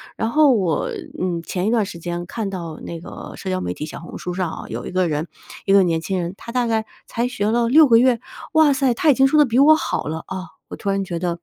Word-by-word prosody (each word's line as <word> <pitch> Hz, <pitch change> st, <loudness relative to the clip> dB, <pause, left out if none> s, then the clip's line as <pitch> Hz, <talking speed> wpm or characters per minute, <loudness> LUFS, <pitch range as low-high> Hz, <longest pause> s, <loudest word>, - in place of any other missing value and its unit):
然 225 Hz, -, -1 dB
后 300 Hz, +2 st, +5 dB
我， 185 Hz, -9 st, 0 dB, 0.3 s
嗯， 175 Hz, -2 st, -1 dB
前 180 Hz, +2 st, -3 dB
一 -, -, +2 dB
段 225 Hz, -3 st, +2 dB
时 190 Hz, -, -8 dB
间 175 Hz, +1 st, -4 dB
看 215 Hz, 0 st, -3 dB
到 170 Hz, -5 st, -6 dB
那 170 Hz, -, -6 dB
个 165 Hz, -, -9 dB
社 190 Hz, -, -6 dB
交 185 Hz, 0 st, -1 dB
媒 90 Hz, -, -3 dB
体 150 Hz, -, -6 dB
小 155 Hz, -, -8 dB
红 170 Hz, -, -9 dB
书 180 Hz, -, -5 dB
上 180 Hz, -2 st, -2 dB
哦， -, -, -7 dB
有 -, -, -5 dB
一 -, -, -6 dB
个 185 Hz, -1 st, +1 dB
人， 155 Hz, +1 st, -2 dB, 0.4 s
一 195 Hz, -, +3 dB
个 200 Hz, -, +7 dB
年 165 Hz, -2 st, +1 dB
轻 190 Hz, +2 st, -2 dB
人， 175 Hz, 0 st, -3 dB
他 235 Hz, -, -9 dB
大 245 Hz, -1 st, 0 dB
概 220 Hz, -1 st, 0 dB, 0.2 s
才 235 Hz, +1 st, -1 dB
学 210 Hz, -5 st, -2 dB
了 235 Hz, +1 st, +2 dB
6 305 Hz, +4 st, +7 dB
个 230 Hz, -3 st, +6 dB
月， 245 Hz, 0 st, +4 dB, 0.3 s
哇 315 Hz, -2 st, +5 dB
塞， 265 Hz, -2 st, +2 dB
他 305 Hz, +6 st, +1 dB
已 -, -, +8 dB
经 270 Hz, +1 st, +4 dB
说 305 Hz, +3 st, +3 dB
得 295 Hz, -, +7 dB
比 235 Hz, -2 st, -1 dB
我 305 Hz, +3 st, +7 dB
好 -, -, -2 dB
了 160 Hz, +1 st, -3 dB
哦， 190 Hz, -1 st, -5 dB, 0.2 s
我 -, -, -7 dB
突 200 Hz, -, -4 dB
然 195 Hz, 0 st, 0 dB
觉 175 Hz, -3 st, -4 dB
得 170 Hz, -1 st, -2 dB
195 Hz, 295 characters per minute, -21 LUFS, 175-240 Hz, 0.4 s, 已